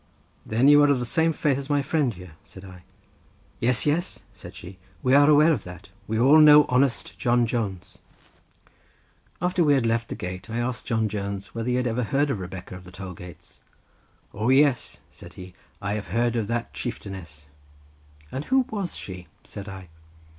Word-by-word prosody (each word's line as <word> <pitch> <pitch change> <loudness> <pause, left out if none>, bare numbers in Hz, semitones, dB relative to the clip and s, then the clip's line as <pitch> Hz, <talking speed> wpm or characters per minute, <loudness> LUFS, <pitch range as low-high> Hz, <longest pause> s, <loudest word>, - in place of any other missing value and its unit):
"Then 115 +5 +2
you 145 0 +7
are 145 - +5
of 140 - +3
the 125 - -3
same 160 +7 +1
faith 145 -3 0
as 140 +1 -8
my 145 -1 +1
friend 145 -2 0
here," 90 -4 -12
said 95 0 -14
I. 90 -1 -12 0.8
"Yes, 120 0 +1
yes," 160 +5 -1
said - - -12
she, 90 +2 -11 0.2
"we 130 - +2
are 145 +1 +6
aware 155 +2 +5
of - - -3
that. 90 +1 -11 0.2
We 110 +1 -1
all 140 +6 +6
know 150 -1 +8
honest 125 0 0
John 120 0 +2
Jones." 110 -6 -4 1.4
After 180 0 +2
we 145 -2 +4
had 130 -4 +1
left 115 0 0
the - - -4
gate 90 +4 -7
I 115 - -4
asked 120 0 -3
John 110 -2 0
Jones 100 -1 -5
whether 115 +1 -3
he 125 - +1
had 125 0 0
ever 120 +1 -1
heard 140 +6 0
of 105 - -3
Rebecca 95 0 -8
of 90 - -11
the 90 - -13
toll 95 0 -8
gates. 90 0 -13 0.7
"O, 110 +4 -1
yes," 135 -2 +2
said - - -14
he; 90 -1 -11 0.3
"I 100 +1 -1
have 105 -1 -4
heard 120 0 0
of 110 -3 -1
that 115 0 -3
chieftainess." 95 - -7 0.9
"And 135 +3 -5
who 265 -1 +2
was 200 -5 -4
she?" 90 -2 -8 0.2
said 100 0 -9
I. 95 -2 -10
115 Hz, 190 wpm, -24 LUFS, 95-140 Hz, 1.4 s, know